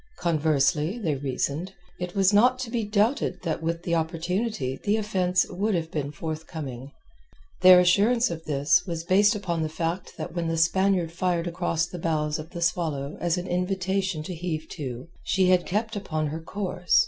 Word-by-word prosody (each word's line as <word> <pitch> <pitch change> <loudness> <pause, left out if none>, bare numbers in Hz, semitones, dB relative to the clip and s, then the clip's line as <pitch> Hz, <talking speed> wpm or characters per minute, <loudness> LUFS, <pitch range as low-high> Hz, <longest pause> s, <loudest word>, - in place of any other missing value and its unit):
Conversely, 155 - +1
they 170 -10 -1
reasoned, 140 +6 -2 0.3
it 180 +1 -5
was 195 0 +4
not 250 +5 +5
to 255 -3 -5
be 235 -2 0
doubted 210 +6 0
that 160 -2 -2
with 165 +1 -2
the 170 - -1
opportunity 165 - -1
the 210 +1 +2
offence 185 -4 +1
would 200 +3 -1
have 165 -1 -2
been 145 -2 -3
forthcoming. 150 -4 -6 0.7
Their 185 -1 +9
assurance 205 +6 +3
of 165 -1 -6
this 150 +4 +3
was 165 -2 -3
based 200 +5 +4
upon 175 -5 -2
the 155 - -1
fact 165 +3 -3
that 160 0 -5
when 170 -1 -1
the 165 0 -1
Spaniard 180 +1 +2
fired 175 0 0
across 170 -1 -1
the 175 +1 -8
bows 155 -2 -1
of 155 +1 -8
the 170 -1 -4
Swallow 155 -5 -1
as 175 0 +1
an 180 - -3
invitation 190 -1 -1
to 180 - -5
heave 160 -2 -4
to, 130 -2 -6 0.2
she 185 -1 +2
had 180 -1 +3
kept 220 +3 -1
upon 155 -6 -2
her 160 +2 -5
course. 180 0 0
175 Hz, 180 wpm, -26 LUFS, 160-190 Hz, 0.7 s, Their